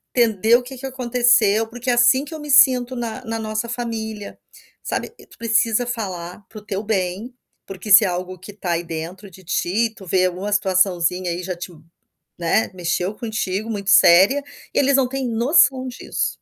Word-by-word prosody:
entender 225 -1 +3
o 250 - +1
que 260 +2 -10
é - - -13
que 270 - -8
aconteceu, 240 -4 +2
porque 245 +2 -6
é - - +2
assim 245 +4 +4
que 320 - -10
eu 310 - -7
me 295 0 -9
sinto 255 -2 +5
na 230 -2 -5
na 225 0 -3
nossa 220 +1 -4
família, 220 -3 -5 0.4
sabe". - - -4
Tu 445 -3 -20
precisa 230 +1 +1
falar 190 -5 -6
para 220 - -13
o 210 - -21
teu 200 -1 -3
bem, 200 +2 -2 0.4
porque 195 +2 -7
se 200 - +9
é - - +1
algo 180 +1 -4
que 200 +3 -11
tá 190 -4 -4
aí 170 +1 -2
dentro 170 +5 -7
de 185 +2 -16
ti, 205 +6 -1
tu 195 - -13
vê 185 +1 +2
alguma 185 +3 -3
situaçãozinha 185 -3 +1
aí 175 +1 -5
já 180 -1 -4
te, 175 +1 -8
hum, 160 -1 -18 0.6
né, 170 +6 0
mexeu 180 +3 -2
contigo, 220 -2 -4
muito 200 -2 -5
séria, 195 +14 +6 0.3
eles 275 0 +3
não 260 -2 +1
têm 270 -1 -3
noção 255 +2 +3
disso. 250 - -3
215 Hz, 195 wpm, -20 LUFS, 185-240 Hz, 0.6 s, se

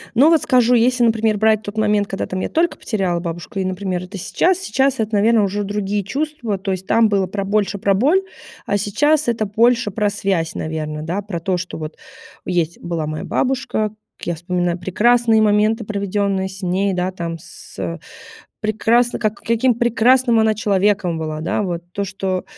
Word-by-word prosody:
Ну, 280 +7 +6
вот 325 -2 +4
скажу, 250 -1 +3
если, 245 +1 +3
например, 220 -2 +2
брать 220 0 +3
тот 205 +1 -7
момент, 210 -1 +2
когда 195 - -3
там 185 - -4
я - - -2
только 335 +1 +1
потеряла 185 -6 -1
бабушку, 175 +5 -6
и, 190 - 0
например, 185 -1 -3
это 195 +2 -8
сейчас, 360 - +1
сейчас 275 -8 +1
это, 220 0 -2
наверно, 220 +2 +4
уже 205 +1 -2
другие 205 0 -2
чувства. 265 -3 -3
То 195 0 -3
есть 185 0 -5
там 230 -1 +4
было 195 -2 +1
про 195 +2 -3
больше 205 0 0
про 195 0 +2
боль, 300 - +3 0.4
а 205 - +1
сейчас 295 +9 +1
это 225 -2 0
больше 230 +2 +2
про 205 +1 0
связь, 185 -5 -1
наверно, 155 -1 -4
да, 175 +6 -3
про 185 -4 -5
то, 180 +2 0
что 180 -1 -5
вот 155 0 -7 0.5
есть 170 -2 -1
была 165 -3 -3
моя 155 0 -4
бабушка, 250 -5 -1 0.3
как - - -9
я 170 - 0
вспоминаю 175 +1 -1
прекрасные 225 +5 +3
моменты, 215 +2 +2
проведенные 200 -1 -1
с 190 +1 -11
ней, 190 +2 0
да, 185 0 -1
там, 170 -2 -5
с, 165 - -13
э, - - -3 0.6
прекрасны 225 +3 +1
как 215 0 0
каким 230 +2 +2
прекрасным 240 +1 +3
она 220 0 +3
человеком 200 -4 +1
была, 155 -1 -4
да. 170 +6 -1
Вот 175 -3 -3
то, 200 - -2
что 190 -1 -3
205 Hz, 190 wpm, -19 LUFS, 185-230 Hz, 0.6 s, Ну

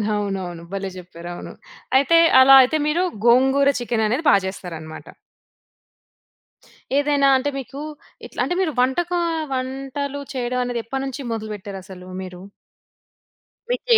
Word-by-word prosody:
అవునవును. 190 -5 -4
భలే 195 0 -3
చెప్పారు. 175 -1 -9 0.4
అయితే 280 +5 +4 0.2
అలా 265 +1 +8
అయితే 260 +5 +2
మీరు 335 +4 +1 0.2
గోంగూర 265 +3 +4
చికెననేది 235 +3 0
బా - - +7
చేస్తారనమాట. 165 -4 -7 1.9
ఏదైనా 285 -1 +3
అంటే 285 +2 -1
మీకూ 275 +2 -7 0.4
ఇట్ల్ - - -5
అంటే, - - -1
మీరు 350 -4 0
వంటకా 345 +8 +1 0.3
వంటలు 270 +2 -4
చెయడవనేది 245 -1 -2
ఎప్పడనుంచి 270 +2 -4
మొదలు 220 -1 -5
బెట్టారసలు 190 -2 -9 0.2
మీరు? 180 0 -9 1.3
మీకు - - -2
250 Hz, 105 wpm, -22 LUFS, 195-275 Hz, 1.9 s, అలా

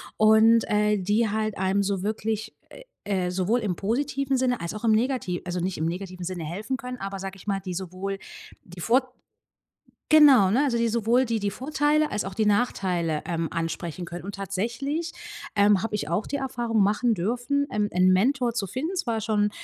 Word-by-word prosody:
und, 220 +1 +5
äh, 210 0 +2
die 205 +4 +1
halt 215 0 -2
einem 190 +1 +1
so 195 -1 -1
wirklich, 220 +1 -3 0.5
äh, 195 -3 0
äh, 180 - -2
sowohl 190 +6 +1
im 205 -6 -2
positiven 270 - -1
Sinne 250 -1 0
als 170 - -4
auch 215 +2 -5
im 225 - +4
negati 225 -6 0
also 180 0 -3
nicht 185 +1 -2
im 160 - -1
negativen 180 +1 -4
Sinne 175 -2 -4
helfen 205 +11 -3
können, 250 +1 -7
aber 195 0 -5
sage 195 0 -6
ich 195 - -15
mal, 195 -1 0
die 185 -1 -6
sowohl 190 +2 -5 0.4
die 175 0 -13
vor 255 +7 +1 0.9
genau, 275 -11 +7
ne, 255 +7 +3
also 255 -5 +1
die 235 0 +2
sowohl 235 +3 +2
die 230 -2 -1
die 205 -1 -1
Vorteile 295 +6 0
als 210 - -2
auch 195 -1 -6
die 220 - +1
Nachteile, 185 -7 0
ähm, 165 -1 -2
ansprechen 165 +1 -4
können. 170 0 -8
Und 200 +1 -6
tatsächlich, 240 - -3 0.4
ähm, 200 -1 +4
habe 220 0 -2
ich 155 -8 -3
auch 175 +6 -1
die - - -3
Erfahrung 240 -5 -1
machen 215 +3 +2
dürfen, 245 +9 0
ähm, 210 -1 0
'n 185 +1 +4
Mentor 245 +5 +2
zu 220 -4 -2
finden. 305 - -3
Zwar 235 -11 -1
schon, 210 -1 +1
210 Hz, 195 wpm, -25 LUFS, 185-240 Hz, 0.9 s, genau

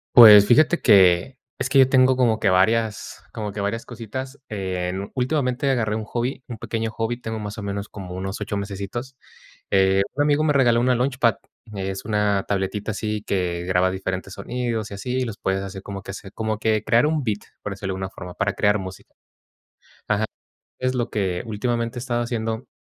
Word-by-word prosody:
Pues, 105 -4 +11
fíjate 155 +9 +4
que 95 +3 +5 0.2
es 130 - -2
que 135 0 +4
yo 130 - +7
tengo 130 -1 +4
como 120 -4 +3
que 100 - +3
varias 105 +3 +1
como 105 -2 -5
que 105 - -4
varias 105 +3 -2
cositas. 130 +4 -7
Eh, 95 -3 -2 0.2
últimamente, 130 0 0
agarré 115 -5 +1
un 110 - -3
hobby, 120 +4 -3
un 120 - -6
pequeño 115 +1 -3
hobby, 115 +2 -3
tengo 110 0 -4
más 105 0 -6
o 105 - -5
menos 100 0 -4
como 95 -3 -8
unos 95 +2 -5
8 105 0 -2
mesecitos. 100 +6 -5 0.6
Eh, 95 0 +4
un 145 - +1
amigo 145 +1 +2
me 155 - +3
regaló 120 -4 +4
una 125 +1 +3
launchpad, 125 -3 +2 0.4
es 95 0 -4
una 105 -2 +1
tabletita 100 +2 -2
así 105 0 -3
que 90 -4 -1
graba 90 0 +2
diferentes 95 0 -4
sonidos 120 -3 -3
y - - -5
así, 125 +6 -4
y - - +1
los 115 -4 -6
puedes 95 0 -1
hacer 95 0 -7
como 100 0 -7
que 100 - -7
se 95 0 -9
como 110 0 -2
que 110 -1 +1
crear 120 +4 +4
un 155 -1 0
beat, 105 -4 -1 0.2
por 105 - -4
decirlo 95 -1 -4
de - - -4
alguna 95 0 -4
forma, 90 -1 -9
para 100 0 0
crear 105 +1 +2
música. 95 -1 -9 1.0
Ajá, 110 0 +1 0.5
es 130 0 -1
lo 120 -1 -1
que 95 -4 -1
últimamente 115 +2 -2
he - - -4
estado 120 -1 -1
haciendo, 115 -1 -3
110 Hz, 195 wpm, -23 LUFS, 100-120 Hz, 1.0 s, Pues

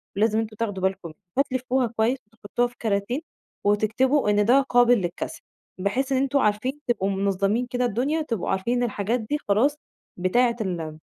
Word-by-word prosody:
ولازم 215 +2 +2
أنتم 220 -1 -4
تاخدوا 205 -4 -3
بالكم. 190 -4 -2 0.2
هتلِفّوها 255 -2 +1
كويس 230 +3 0
وتحطّوها 225 +2 -2
في 245 - -18
كَراتين 220 +6 -1 0.4
وتكتبوا 220 +5 +2
إن 205 0 +3
ده 260 +4 +5
قابل 245 -2 +4
للكَسر 175 -1 -4 0.4
بحيث 250 +8 -1
إن 265 - +3
أنتم 275 +1 +2
عارفين 250 +5 0
تبقوا 200 -5 +1
منظّمِين 200 +4 0
كده 250 0 0
الدنيا، 255 +8 0
تبقوا 230 - -3
عارفين 235 +6 0
إن 245 - +1
الحاجات 225 +1 -1
دي 240 +7 -2
خلاص 230 +9 +3 0.4
بتاعة 235 +7 +2
ال 165 -6 -3
225 Hz, 160 wpm, -25 LUFS, 200-250 Hz, 0.4 s, ده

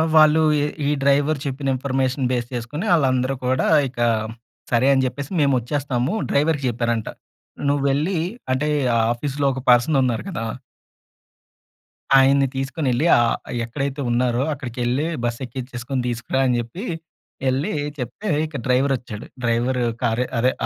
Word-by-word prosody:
వాళ్ళు 155 0 +6 0.2
ఏ - - +1 0.2
ఈ - - +2
డ్రైవరు 140 +2 +3
చెప్పిన 135 0 -3
ఇన్ఫర్మేషన్ 130 0 -1
బేస్ 120 -2 -1
చేసుకొని 125 - -4
ఆళ్ళందరూ 130 -4 +2
కూడా 130 +1 +1 0.2
ఇక 125 -1 -10 0.7
సరే 120 +2 +3
అని 135 -1 +2
జెప్పేసి 135 +4 -4
మేము 140 -1 +3
వచ్చేస్తాము. 130 - -1 0.2
డ్రైవరుకి 145 -1 +1
జెప్పారంట. 115 -1 -1 0.6
నువ్వు 140 0 +1
వెళ్లి 155 +7 0 0.4
అంటే 140 +4 0 0.5
ఆఫీస్‌లో 140 +3 -3
ఒక 130 - -5
పర్సన్ 125 +5 +5
ఉన్నారు 120 -3 -1
కదా! 170 -11 -4 1.8
ఆయన్ని 135 +1 +4
తీసుకొ‌నేళ్లి 135 0 -1
ఆహ్, 120 -1 +2 0.3
"ఎక్కడైతే 140 +3 -3
ఉన్నారో, 120 +1 +1
అక్కడి‌కెళ్లి 125 +1 -2 0.2
బస్సు 120 +2 -2
ఎక్కించేసుకొని 125 +1 -4
తీసుకురా." 120 +3 -1
అని 125 -1 +2
చెప్పి 120 - -7 0.6
ఎళ్లి 130 +3 0 0.3
చెప్తే 130 - -6 0.2
ఇక 155 -2 -6
డ్రైవరొచ్చాడు. 125 -4 0 0.2
డ్రైవరు 120 +2 +1 0.2
కారు 120 +1 +1
అదే 125 +3 +3
130 Hz, 130 wpm, -22 LUFS, 120-140 Hz, 1.8 s, వాళ్ళు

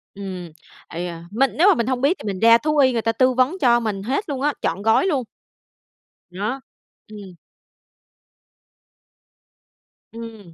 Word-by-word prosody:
Ừm, 185 -4 -7 0.4
ây 175 +2 -5
da, 170 -1 -7
mình 260 +6 +1
nếu 345 +6 +5
mà 405 - +6
mình 235 - -1
hông 255 -1 -1
biết 300 +7 +2
thì - - -10
mình 195 -2 -3
ra 230 +2 +6
thú 300 +5 -1
y 260 -3 +4
người 230 - 0
ta 225 - 0
tư 255 +3 +2
vấn 260 +8 +1
cho 240 -3 +4
mình 210 -4 -3
hết 275 - -2
luôn 270 -2 -3
á, 295 +1 +1
trọn 175 +4 -2
gói 220 - +3
luôn. 285 -8 0 1.1
Đó. 210 +9 -4 0.5
Ừm. 200 -4 -11 2.8
Ừm. 225 -6 -10
230 Hz, 165 wpm, -21 LUFS, 200-265 Hz, 2.8 s, mà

